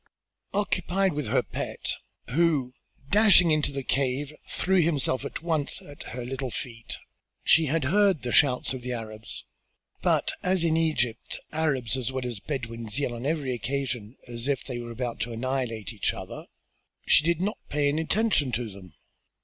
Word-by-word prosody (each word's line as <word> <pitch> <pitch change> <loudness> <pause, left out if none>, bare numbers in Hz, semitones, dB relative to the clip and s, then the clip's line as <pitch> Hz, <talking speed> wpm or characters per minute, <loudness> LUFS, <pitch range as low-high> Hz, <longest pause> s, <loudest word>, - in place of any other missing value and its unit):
Occupied 195 -2 +1
with 145 -4 -2
her - - +2
pet, - - -2 0.4
who, 145 -4 +2 0.4
dashing 200 -5 +7
into 150 -2 +2
the 135 -1 -3
cave, 135 +2 0 0.2
threw 190 0 +3
himself 145 -5 +1
at 140 - -5
once 160 -4 0
at 145 0 -12 0.2
her 125 - -4
little 130 +1 -3
feet, 115 -1 -5 0.5
she 160 -1 +6
had 155 +2 +1
heard 195 +3 +3
the 120 - -2
shouts 130 -1 +4
of 130 - -5
the 125 0 -3
Arabs, 110 -2 -5 0.6
but, - - +2
as 185 -1 +2
in 160 -1 +3
Egypt 155 -8 0
Arabs 140 -7 0
as 130 -1 -1
well 130 -1 -3
as 120 -5 -3
Bedouins 115 -3 -4
yell 140 -4 0
on 120 +3 -4
every 145 -5 0
occasion 125 -1 -3
as 120 +1 -4
if 140 -2 0
they 125 -3 -4
are 120 0 -6
about 120 0 -4
to 120 - -2
annihilate 120 -2 -2
each 105 - 0
other, - - -8 0.6
she - - +6
did 170 0 +2
not 205 +4 -1
pay 145 0 +2
any 150 +3 +1
attention 170 - +2
to 115 -2 -2
them. 95 -4 -13
135 Hz, 170 wpm, -27 LUFS, 120-160 Hz, 0.6 s, dashing